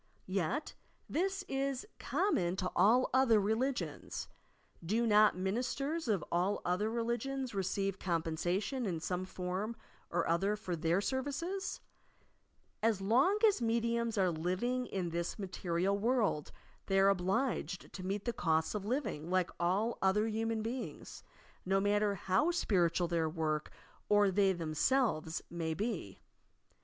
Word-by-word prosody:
Yet, 195 Hz, -, -1 dB, 0.3 s
this 385 Hz, +4 st, -1 dB
is 270 Hz, -1 st, -2 dB
common 185 Hz, -, +1 dB
to 185 Hz, -1 st, -2 dB
all 225 Hz, +8 st, +4 dB
other 255 Hz, -4 st, +5 dB
religions. 230 Hz, +7 st, -2 dB, 0.6 s
Do 220 Hz, +8 st, +1 dB
not 210 Hz, -1 st, +6 dB
the -, -, -9 dB
ministers 265 Hz, -, -1 dB
of 200 Hz, -7 st, +1 dB
all 180 Hz, +4 st, +1 dB
other 185 Hz, +5 st, +1 dB
religions 235 Hz, +3 st, -2 dB
receive 195 Hz, 0 st, -1 dB
compensation 180 Hz, -, -1 dB
in 170 Hz, -4 st, -2 dB
some 180 Hz, +3 st, -2 dB
form 185 Hz, +5 st, -3 dB, 0.3 s
or 175 Hz, -, 0 dB
other 195 Hz, +5 st, +2 dB
for 190 Hz, -4 st, -4 dB
their 165 Hz, +3 st, +1 dB
services 290 Hz, -, -3 dB, 1.0 s
i -, -, +3 dB
As 220 Hz, -4 st, +1 dB
long 250 Hz, -, +3 dB
as 405 Hz, -, +2 dB
mediums 235 Hz, 0 st, 0 dB
are 185 Hz, -2 st, +3 dB
living 185 Hz, +10 st, -1 dB
in 180 Hz, -3 st, -3 dB
this 170 Hz, +1 st, -2 dB
material 185 Hz, -1 st, -1 dB
world, 215 Hz, -, +1 dB, 0.4 s
they 195 Hz, -1 st, +3 dB
are 195 Hz, +1 st, +6 dB
obliged 190 Hz, -, -1 dB
to 185 Hz, -, -7 dB
meet 195 Hz, +2 st, -2 dB
the 240 Hz, -, 0 dB
costs 160 Hz, -4 st, +1 dB
of 210 Hz, -2 st, -3 dB
living 210 Hz, -, -2 dB
like 185 Hz, -1 st, +1 dB
all 195 Hz, +7 st, +1 dB
other 195 Hz, +3 st, +3 dB
human 225 Hz, 0 st, -1 dB
beings, 245 Hz, +3 st, -5 dB, 0.4 s
no 195 Hz, +1 st, +2 dB
matter 205 Hz, +1 st, +2 dB
how 190 Hz, -, +2 dB
spiritual 180 Hz, -, +2 dB
their 165 Hz, -2 st, 0 dB
work 155 Hz, -2 st, -1 dB, 0.4 s
or 205 Hz, -1 st, +5 dB
they 195 Hz, 0 st, +4 dB
themaelvea 165 Hz, -, 0 dB
may 165 Hz, -2 st, -2 dB
be. 200 Hz, -, -3 dB
200 Hz, 140 wpm, -34 LUFS, 180-235 Hz, 1.0 s, not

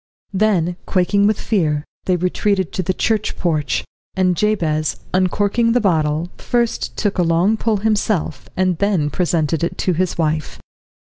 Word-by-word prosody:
Then, 185 Hz, -4 st, +1 dB
quaking 200 Hz, +2 st, +2 dB
with 215 Hz, 0 st, +1 dB
fear, 155 Hz, -8 st, 0 dB, 0.2 s
they 185 Hz, -, +2 dB
retreated 185 Hz, +1 st, 0 dB
to -, -, -1 dB
the 185 Hz, -, 0 dB
church 215 Hz, +2 st, -1 dB
porch, 155 Hz, -5 st, 0 dB, 0.3 s
and 185 Hz, -2 st, +2 dB
Jabez, 165 Hz, -6 st, 0 dB, 0.2 s
uncorking 205 Hz, +5 st, +2 dB
the 245 Hz, -, +3 dB
bottle, 160 Hz, -4 st, 0 dB
first 240 Hz, -1 st, -1 dB
took 205 Hz, -3 st, -1 dB
a -, -, +5 dB
long 175 Hz, +5 st, +3 dB
pull 220 Hz, -1 st, 0 dB
himself, 210 Hz, -3 st, -1 dB
and 185 Hz, -2 st, +1 dB
then 190 Hz, -8 st, +1 dB
presented 165 Hz, -2 st, 0 dB
it 170 Hz, -, -2 dB
to 185 Hz, -, 0 dB
his 180 Hz, +2 st, -1 dB
wife. 155 Hz, -2 st, -1 dB
185 Hz, 150 wpm, -19 LUFS, 165-205 Hz, 0.3 s, a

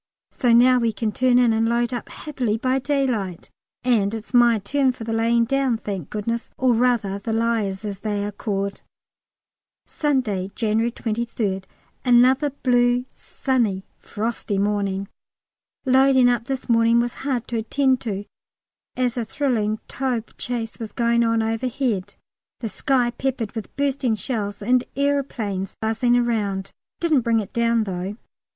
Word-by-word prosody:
so 245 Hz, -3 st, +1 dB
now 250 Hz, +2 st, +6 dB
we 230 Hz, -1 st, +1 dB
can 220 Hz, 0 st, -2 dB
turn 250 Hz, +2 st, +3 dB
in, 245 Hz, -2 st, +4 dB
and 225 Hz, +1 st, +2 dB
load 235 Hz, +1 st, +1 dB
up 240 Hz, -, -5 dB
happily 250 Hz, -8 st, -2 dB
by 255 Hz, +3 st, +1 dB
daylight, 255 Hz, -, -1 dB, 0.3 s
and 225 Hz, -4 st, +2 dB
it's 225 Hz, +3 st, -9 dB
my 240 Hz, -2 st, +6 dB
turn 265 Hz, +6 st, +1 dB
for 245 Hz, -, -9 dB
the 225 Hz, 0 st, -3 dB
lying 230 Hz, +1 st, +2 dB
down, 270 Hz, -1 st, +1 dB
thank 195 Hz, -8 st, -5 dB
goodness, 230 Hz, +3 st, -3 dB
or 255 Hz, -2 st, +3 dB
rather 230 Hz, -5 st, +1 dB
the 225 Hz, +3 st, -4 dB
Liers, 220 Hz, -3 st, 0 dB
as 200 Hz, -2 st, -4 dB
they 205 Hz, -1 st, -2 dB
are 205 Hz, -, -3 dB
called. 200 Hz, -1 st, -3 dB, 1.0 s
Saturday, 240 Hz, -11 st, -1 dB
January 225 Hz, +1 st, +1 dB
23rd. 220 Hz, -4 st, -2 dB, 0.4 s
Another 255 Hz, +3 st, +4 dB
blue, 245 Hz, -2 st, +2 dB
sunny, 225 Hz, -8 st, -1 dB
frosty 215 Hz, -1 st, -3 dB
morning. 200 Hz, -1 st, 0 dB, 0.8 s
Loading 260 Hz, -1 st, +5 dB
up 240 Hz, -2 st, 0 dB
this 265 Hz, 0 st, -4 dB
morning 230 Hz, 0 st, +4 dB
was 240 Hz, 0 st, 0 dB
hard 260 Hz, -4 st, -2 dB
to 235 Hz, -, -1 dB
attend 265 Hz, +3 st, +1 dB
to, 205 Hz, -4 st, -4 dB, 0.7 s
as 250 Hz, 0 st, 0 dB
a 240 Hz, -, 0 dB
thrilling 220 Hz, -4 st, 0 dB
Taube 250 Hz, -4 st, -3 dB
chase 235 Hz, -2 st, -4 dB
was 225 Hz, -2 st, -6 dB
going 235 Hz, 0 st, +2 dB
on 230 Hz, -1 st, +2 dB
overhead, 225 Hz, -3 st, -2 dB, 0.4 s
the 225 Hz, -, -3 dB
sky 245 Hz, +3 st, +1 dB
peppered 240 Hz, -3 st, -2 dB
with 225 Hz, -3 st, -7 dB
bursting 275 Hz, -4 st, 0 dB
shells, 205 Hz, -1 st, -4 dB
and 250 Hz, +3 st, +3 dB
aeroplanes 255 Hz, -9 st, -1 dB
buzzing 225 Hz, +2 st, +2 dB
around: 210 Hz, -5 st, -1 dB, 0.3 s
didn't 315 Hz, -6 st, +3 dB
bring 230 Hz, -1 st, +2 dB
it 205 Hz, -, -6 dB
down 235 Hz, -1 st, +2 dB
though. 190 Hz, +1 st, -4 dB
235 Hz, 150 wpm, -23 LUFS, 210-250 Hz, 1.0 s, now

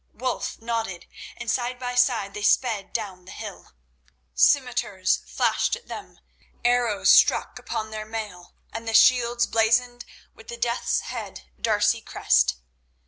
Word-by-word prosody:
Wulf 255 Hz, 0 st, -3 dB
nodded, 225 Hz, -6 st, -4 dB, 0.3 s
and -, -, -8 dB
side 245 Hz, +2 st, -1 dB
by 250 Hz, 0 st, -4 dB
side 245 Hz, -5 st, +1 dB
they 210 Hz, -, -6 dB
sped 210 Hz, -2 st, +1 dB
down 190 Hz, -5 st, -5 dB
the 185 Hz, -, -11 dB
hill. -, -, -9 dB, 0.6 s
Scimitars 205 Hz, -, +2 dB
flashed -, -, +1 dB
at 475 Hz, -, -15 dB
them, -, -, -9 dB, 0.5 s
arrows 240 Hz, -4 st, +3 dB
struck -, -, +4 dB
upon 220 Hz, 0 st, -5 dB
their 215 Hz, 0 st, -5 dB
mail 210 Hz, -5 st, -7 dB, 0.2 s
and 225 Hz, +1 st, -6 dB
the 225 Hz, -, 0 dB
shields 240 Hz, -1 st, +5 dB
blazoned 240 Hz, +2 st, +1 dB, 0.3 s
with 225 Hz, -, -17 dB
the 235 Hz, -, -7 dB
Death's 235 Hz, +1 st, 0 dB
head -, -, -8 dB
D'Arcy 220 Hz, 0 st, +2 dB
crest. -, -, +2 dB
225 Hz, 140 wpm, -24 LUFS, 210-245 Hz, 0.6 s, shields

